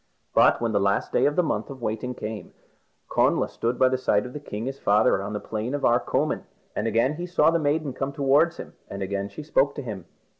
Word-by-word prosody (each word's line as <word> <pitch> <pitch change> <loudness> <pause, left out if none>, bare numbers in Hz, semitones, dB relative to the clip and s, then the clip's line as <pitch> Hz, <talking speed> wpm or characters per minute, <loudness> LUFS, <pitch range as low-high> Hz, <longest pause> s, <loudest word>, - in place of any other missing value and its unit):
But - - +5
when 115 -1 -1
the 100 - +2
last 100 0 +1
day - - +3
of 145 - 0
the 180 - +3
month 110 -9 -2
of 135 -1 -8
waiting 120 +2 -3
came, 110 -2 -6 0.5
Connla - - +2
stood 120 +2 -2
by 130 - +5
the 130 0 0
side 105 -4 +2
of 125 - -8
the 150 - -5
king 110 -6 -6
his 135 +1 -5
father 105 0 +3
on 100 +2 -5
the 105 - -2
Plain 110 +6 -3
of 145 - -1
Arcomin, 120 +1 +1 0.3
and 105 - -1
again 115 +7 +1
he 175 +1 -4
saw 165 -3 +4
the 170 - +2
maiden 145 -2 0
come 135 +2 -3
towards 145 +4 +3
him, - - -9 0.2
and 100 0 -4
again 100 +1 -3
she 155 - -8
spoke 140 -2 +2
to 145 - -5
him. 100 -7 -6
125 Hz, 235 wpm, -25 LUFS, 105-145 Hz, 0.5 s, But